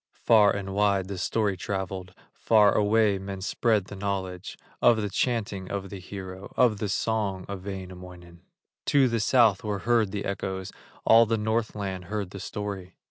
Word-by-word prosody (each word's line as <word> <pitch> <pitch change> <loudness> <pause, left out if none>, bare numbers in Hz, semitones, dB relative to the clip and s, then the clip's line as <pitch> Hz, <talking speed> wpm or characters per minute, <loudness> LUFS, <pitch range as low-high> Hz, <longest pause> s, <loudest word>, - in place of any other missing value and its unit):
Far 110 -3 +6
and 100 -1 -3
wide 100 -2 +1
the 95 -2 -4
story 105 -1 0
travelled, 95 -1 -5 0.2
Far 105 -2 +4
away 105 -1 +3
men 95 0 -6
spread 110 0 +1
the 100 - -9
knowledge 95 -2 -4 0.2
Of 115 -2 +5
the 105 -2 -2
chanting 105 -6 -1
of 100 -1 -4
the 100 - -6
hero, 95 +1 -8
Of 115 -5 +3
the 105 - -2
song 100 -3 -1
of 100 -2 -6
Wainamoinen; 90 -3 -9 0.5
To 140 -2 +4
the 115 -1 0
South 110 -2 +4
were 105 -2 -2
heard 115 -4 +3
the 100 0 -4
echoes, 95 -1 -4 0.3
All 115 0 +6
of 115 - +2
Northland 105 -4 -2
heard 100 0 -4
the 100 - -8
story. 100 -2 -6
100 Hz, 165 wpm, -27 LUFS, 95-110 Hz, 0.5 s, Far